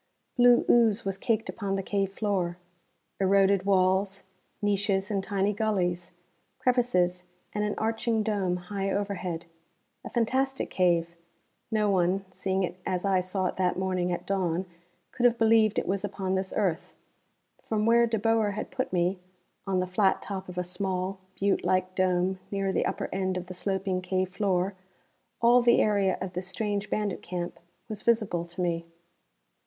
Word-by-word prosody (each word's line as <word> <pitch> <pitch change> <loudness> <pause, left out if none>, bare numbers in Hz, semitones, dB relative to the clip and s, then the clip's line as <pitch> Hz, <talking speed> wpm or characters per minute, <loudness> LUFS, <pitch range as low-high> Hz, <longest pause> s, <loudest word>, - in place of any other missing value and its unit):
Blue 245 -1 +6
ooze 230 -3 +4
was 195 0 -2
caked 225 0 0
upon 200 -3 -3
the 195 - -2
cave 195 0 -1
floor. 195 -4 -1 0.6
Eroded 195 0 +3
walls; 190 +1 +2 0.4
niches 205 -1 0
and 195 -2 0
tiny 200 0 0
gullies; 180 -5 -1 0.4
crevices 180 -8 +1 0.3
and 210 - -1
an 210 -1 -1
arching 225 0 0
dome 195 -4 0
high 195 +2 -3
overhead. 185 -4 -2 0.6
A - - -6
fantastic 265 +3 0
cave 170 -2 +2 0.5
no 215 -1 +1
one, 190 0 +1
seeing 190 0 -1
it 180 0 -4
as 185 +1 -2
I 195 -2 +3
saw 185 +1 -1
it - - -2
that 180 -1 +1
morning 185 -1 0
at 175 - -3
dawn, 185 -2 0 0.5
could 245 -1 +4
have 240 -1 0
believed 220 -2 +4
it - - 0
was 195 +1 -1
upon 195 -2 -2
this 190 0 -1
earth. 180 -4 -1 0.7
From 215 -1 -1
where 235 +1 +5
De 225 -1 0
Boer 220 -1 +2
had 210 - -5
put 260 - -2
me 180 +1 +1 0.5
on 190 -1 +1
the 185 - +1
flat 190 +2 +2
top 190 -2 -5
of 180 - -9
a 180 - 0
small, 185 +1 -3 0.2
butte 200 0 +1
like 185 0 +1
dome 185 0 +1
near 195 -1 -1
the - - +1
upper - - -3
end 190 -1 -1
of 180 - -4
the 185 - -8
sloping 190 0 -1
cave 185 0 -1
floor 190 -1 0 0.7
all 240 +1 +6
the 235 0 +5
area 200 -3 +2
of 185 -1 -5
this 180 +1 -2
strange 205 0 -2
bandit 205 -4 -1
camp 175 -1 -5 0.3
was 215 -1 -6
visible 215 -7 +1
to 175 +2 -6
me. 170 -1 -1
195 Hz, 165 wpm, -28 LUFS, 185-210 Hz, 0.7 s, Blue